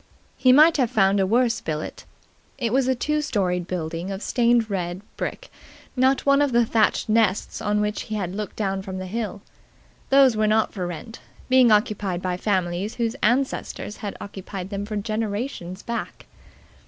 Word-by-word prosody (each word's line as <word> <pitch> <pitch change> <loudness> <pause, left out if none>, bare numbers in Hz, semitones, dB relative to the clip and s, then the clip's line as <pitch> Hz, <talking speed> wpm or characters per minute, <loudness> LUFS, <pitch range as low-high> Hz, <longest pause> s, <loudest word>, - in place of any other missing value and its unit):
He 255 - +4
might 310 +5 +7
have 255 -5 +2
found 200 -3 +3
a 190 - +2
worse 235 +2 +2
billet. 155 -1 -5 0.5
It 235 -4 -1
was 265 -1 +2
a 260 - +2
two 300 +5 0
storied 185 - -1
building 170 0 -4
of 195 +1 -5
stained 235 -2 +2
red 185 -2 -3
brick, - - -5 0.4
not 260 +1 +2
one 280 0 +4
of 285 -3 +1
the 235 0 +4
thatched 220 -1 +1
nests 215 -3 +1
on 210 0 +1
which 210 0 -1
he 215 - -2
had 185 -4 -3
looked 210 -1 -5
down 195 -2 -1
from 190 -1 -6
the 185 - -5
hill. 205 0 -4 0.7
Those 270 -3 +6
were 215 0 +2
not 220 +1 +2
for 180 -3 -3
rent, 225 +7 -8 0.3
being 255 -2 +6
occupied 210 -4 +1
by 185 0 -2
families 185 +1 -1
whose 235 0 -1
ancestors 245 -3 -1
had 205 -2 -6
occupied 195 -1 -7
them 200 0 -4
for 215 - -4
generations 210 -2 -3
back. 235 0 -5
210 Hz, 175 wpm, -24 LUFS, 190-240 Hz, 0.7 s, might